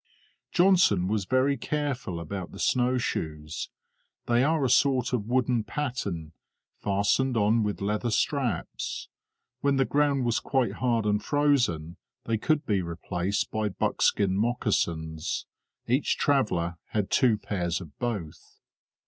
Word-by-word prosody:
Johnson 175 - +4
was 105 -1 0
very 130 +5 +2
careful 135 - -3
about 90 +2 -5
the - - -10
snow 125 0 +2
shoes; 75 -9 -3 0.6
they 120 +1 +3
are 155 -1 +2
a - - +3
sort 130 0 +3
of 110 -4 -1
wooden 125 -2 +1
patten, 100 - -4 0.5
fastened 105 +6 +1
on 110 +2 +3
with 105 -2 -2
leather 105 +4 -1
straps; 120 - -2 0.5
when 140 +1 +2
the 135 0 +3
ground 140 -2 +1
was 120 -1 +1
quite 130 -6 0
hard 115 0 0
and 105 0 +1
frozen 120 - +1 0.3
they 115 -1 -1
could 155 +3 +1
be 100 -5 +1
replaced 90 +3 -2
by 110 -1 0
buckskin 95 0 +1
moccasins; 85 -8 -1 0.4
each 130 +5 +1
traveller 90 - +1
had 105 -3 -2
two 120 -5 +4
pairs 90 -5 -2
of 80 -7 -11
both. 105 -10 -5
110 Hz, 130 wpm, -27 LUFS, 95-130 Hz, 0.6 s, Johnson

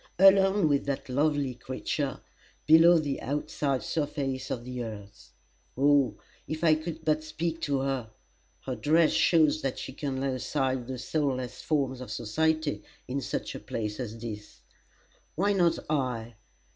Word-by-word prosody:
Alone 195 -1 +6
with 140 -1 +1
that 140 -1 -3
lovely 145 0 +1
creature, 130 +3 -3 0.4
below 165 +2 +7
the 145 -3 -2
outside 140 -2 -1
surface 135 -2 -2
of 120 -1 -4
the 125 -1 -4
earth! 100 - -9 0.5
"Oh, 140 -5 +4 0.3
if 155 +1 -4
I 160 -2 +6
could 160 0 -4
but 155 0 +2
speak 165 +1 -3
to 140 -4 0
her! 135 -4 -2 0.5
Her 130 - -4
dress 160 +3 +3
shows 155 -2 +4
that 135 -3 -2
she - - -6
can 135 -3 -3
lay 135 0 0
aside 130 -1 -1
the 130 -1 -4
soulless 130 -2 -2
forms 135 -4 -1
of 125 - -7
society 155 +8 0 0.3
in 135 +2 -2
such - - -3
a - - -6
place 105 -2 -4
as 115 -3 -5
this: 110 -2 -8 0.7
why 200 +5 +2
not 175 -4 +3
I? 125 -6 -1
140 Hz, 150 wpm, -28 LUFS, 125-155 Hz, 0.7 s, below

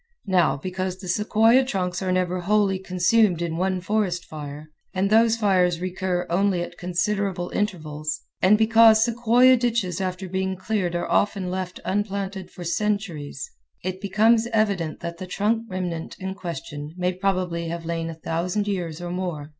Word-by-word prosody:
Now, 180 -7 +3
because 185 +3 -4 0.2
sequoia 225 +5 +4
trunks 180 -7 -2
are 185 -1 -1
never 185 0 0
wholly 195 +1 +2
consumed 185 +1 +2
in 170 -1 -2
one 185 +1 0
forest 180 -3 -1
fire, 150 -1 -8 0.2
and 195 +2 +1
those 225 +1 +5
fires 185 -5 +2
recur 180 0 -2
only 185 0 +1
at - - -8
considerable 180 0 -1
intervals, 155 -6 -2 0.2
and 200 +3 +6
because 225 0 +6
sequoia 240 +2 +5
ditches 230 -6 0
after 185 0 -3
being 190 +1 -2
cleared 190 -2 -2
are 175 - -1
often 195 -3 +1
left 185 -1 -4
unplanted 195 -1 -2
for 180 - -9
centuries, 170 -7 -2 0.4
it 185 +1 -4
becomes 220 +3 +3
evident 205 -8 0
that 170 0 -6
the 185 - -6
trunk 220 +5 0
remnant 180 -3 -4
in 190 0 -4
question 155 -4 -7
may 180 0 0
probably 180 -3 -1
have 165 0 -5
lain 165 0 -2
a 165 - -6
thousand 175 +6 -2
years 175 -5 -3
or 175 0 -4
more. 175 -5 -4
185 Hz, 155 wpm, -24 LUFS, 175-205 Hz, 0.4 s, and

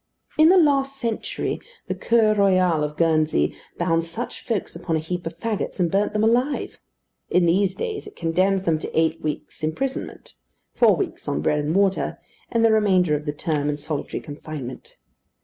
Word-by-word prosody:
In 315 +1 +8
the 380 - +6
last 275 -4 +3
century, 230 -4 -3 0.2
the - - -2
Cour 225 -2 +3
Royale 185 -6 +3
of 150 0 -4
Guernsey 155 - +2 0.2
bound 165 -1 +1
such 170 +9 -6
folks 220 -8 -2
upon 170 -1 -2
a - - +1
heap 175 +2 -4
of 165 0 -7
fagots 220 0 -3
and 170 -2 +1
burnt 205 +2 +1
them 215 0 +1
alive. 250 +6 +1 0.5
In 180 -1 +3
these 190 +3 +2
days 430 -3 -4
it 415 - -12
condemns 185 +3 +1
them 165 -4 +1
to 160 - -2
eight 160 0 +1
weeks' 155 +1 -5
imprisonment; 255 +13 -3 0.4
four 220 -5 +5
weeks - - -4
on 145 - -1
bread 150 - +2
and 150 +3 -1
water, 195 -1 +1 0.3
and 230 -1 +3
the 225 - +5
remainder 190 -7 +3
of 150 +1 -5
the - - +1
term 145 0 -1
in 145 - -1
solitary 150 0 -4
confinement. 145 -4 -8
180 Hz, 180 wpm, -23 LUFS, 155-220 Hz, 0.5 s, In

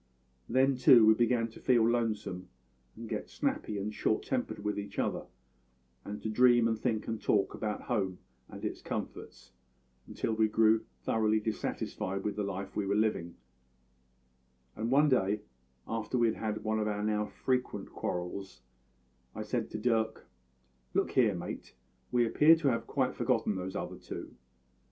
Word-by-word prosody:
Then, 130 0 +3
too, 125 -3 +7
we 110 - +8
began 120 0 +2
to 110 - -13
feel 120 -3 +4
lonesome, 110 -6 -1 0.5
and - - -8
to - - -2
get - - -6
snappy 105 - -2
and 105 +2 -3
short - - 0
tempered 100 - -2
with 105 0 -1
each 100 0 -7
other; - - -1 0.8
to 105 +2 -5
dream 120 +1 +5
and 115 - +1
think 110 -1 -2
and 115 -1 -3
talk 100 -2 +2
about 105 -1 -3
home 95 -7 -1 0.3
and - - -8
its - - -4
comforts, - - -6 0.6
until 115 - -2
we 110 0 +3
grew 110 +1 +3 0.2
thoroughly 110 - +2
dissatisfied 100 -2 -3
with 105 -1 -2
the 105 - -2
life 100 0 -4
we 100 -2 -1
were 100 - +1
living; 105 -6 0 1.4
and 115 +1 -2
one 145 +4 +5
day, 105 -5 +2 0.5
after 115 +2 -2
we 120 -1 +4
had 110 - -3
had 110 -1 -3
one 110 0 0
of 105 - 0
our 105 -1 -2
now 105 0 0
frequent 130 -1 -2
quarrels, 90 +2 -5 0.7
I 110 - -4
said 115 +1 -2
to - - -5
Dirk: 110 -1 0 0.7
"`Look - - +2
here, 110 -6 +3
mate, 85 - -7 0.4
we 120 -1 +3
appear 150 +7 +6
to 160 -4 +1
have 115 -2 -1
quite 130 -2 0
forgotten 110 -3 +1
those 95 0 -4
other - - -4
two. - - -8
110 Hz, 165 wpm, -31 LUFS, 105-120 Hz, 1.4 s, we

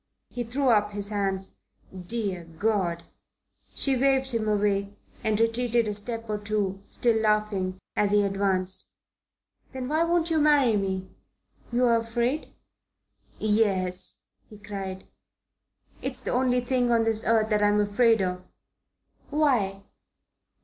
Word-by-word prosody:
He 245 - -3
threw 260 +4 0
up 210 -2 +3
his 200 0 -3
hands 195 -2 -2 0.3
"Dear 190 -1 -3
God!" 170 0 -1 0.7
She 275 -2 +2
waved 265 0 +2
him 220 -2 -1
away 200 -1 0 0.3
and 215 -1 +1
retreated 230 0 +1
a 210 - -1
step 230 +2 -2
or 210 -1 -2
two, 205 -2 -2
still 235 -2 +2
laughing, 210 -4 0 0.2
as 205 -1 +2
he 205 0 +3
advanced. 190 -1 +1 0.9
"Then 260 -1 -4
why 315 +2 +2
won't 340 -1 +1
you 320 - +2
marry 285 -6 +4
me? 190 -2 -2 0.6
You're 240 -1 +3
afraid." 235 +5 -2 0.9
"Yes," 195 -4 +1 0.3
he 210 - -12
cried. 195 -2 -7 0.9
"It's 255 -1 -2
the - - -2
only 250 0 +2
thing 245 0 0
on 230 -1 +3
this 225 -1 +1
earth 220 -1 +2
that 210 0 +2
I'm 205 0 +3
afraid 215 +2 +3
of." 180 0 -2 0.9
"Why?" 240 -11 +1
215 Hz, 130 wpm, -26 LUFS, 195-240 Hz, 0.9 s, marry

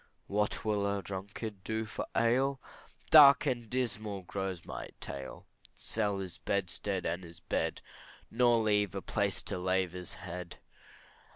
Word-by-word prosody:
What 105 +2 -1
will 100 -2 +1
a 100 - -5
drunkard 100 +2 -6
do 110 0 -2
for 110 - -5
ale? 130 +4 +3 0.5
Dark 145 -2 +9
and 120 -5 -1
dismal 110 -6 -2
grows 95 -2 -4
my - - -6
tale; 65 -2 -7 0.3
Sell 105 -3 -1
his 95 -3 -5
bedstead 95 0 -1
and 85 +2 -2
his 85 -1 -11
bed, - - -2 0.5
Nor 120 0 +4
leave 105 -4 +2
a - - -4
place - - 0
to - - -2
lay 95 +1 +2
his 90 0 -7
head. 90 -2 -7
100 Hz, 145 wpm, -32 LUFS, 90-110 Hz, 0.5 s, Dark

